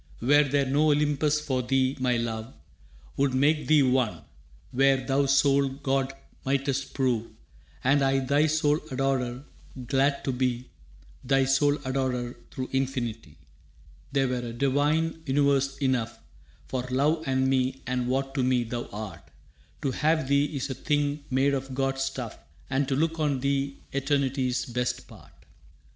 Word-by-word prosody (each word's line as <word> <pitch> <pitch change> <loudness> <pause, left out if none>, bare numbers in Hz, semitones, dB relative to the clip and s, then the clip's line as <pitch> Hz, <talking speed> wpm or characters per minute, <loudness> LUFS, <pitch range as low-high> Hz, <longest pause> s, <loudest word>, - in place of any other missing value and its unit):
«Were 145 +5 +5
there 140 0 +1
no 145 +4 +2
Olympus 150 0 +2
for 135 -4 -1
thee, 130 +1 +1
my 125 -2 +1
love 115 0 -3 0.7
Would 135 -2 +1
make 150 +3 +2
thee 150 -2 +5
one, 125 - +1 0.5
where 135 +1 +4
thou 140 +2 +2
sole 140 0 +4
god 135 -1 -1 0.3
mightst 135 0 -1
prove, 120 -4 0 0.6
And 140 +2 +3
I 135 0 +3
thy 140 +3 +2
sole 150 -1 +2
adorer, 130 -1 -1 0.4
glad 140 +2 +1
to 135 - -1
be 125 -1 -2 0.5
Thy 135 +1 +3
sole 145 +2 +3
adorer 130 -2 -1
through 130 0 -5
infinity. 120 - -2 0.7
That 135 -2 +1
were 125 - -1
a 120 -1 -5
divine 145 +6 +1
universe 135 0 +2
enough 130 -5 0 0.5
For 130 - -2
love 145 +5 +2
and 130 0 +2
me 130 0 0
and 125 -1 -1
what 135 +1 -1
to 135 - 0
me 125 -1 +2
thou 120 +1 -5
art. 100 -6 -8 0.5
To 135 - +1
have 155 +1 +1
thee 140 +1 +3
is 140 -2 -4
a - - -1
thing 145 +1 -1
made 135 +2 +2
of 135 -1 -3
gods' 135 0 0
stuff - - -5 0.3
And 135 +1 +1
to 135 - 0
look 165 +3 0
on 145 -4 +1
thee 140 0 -1 0.2
eternity's 135 -2 0
best 125 0 -3
part. - - -17
135 Hz, 150 wpm, -27 LUFS, 130-140 Hz, 0.7 s, Were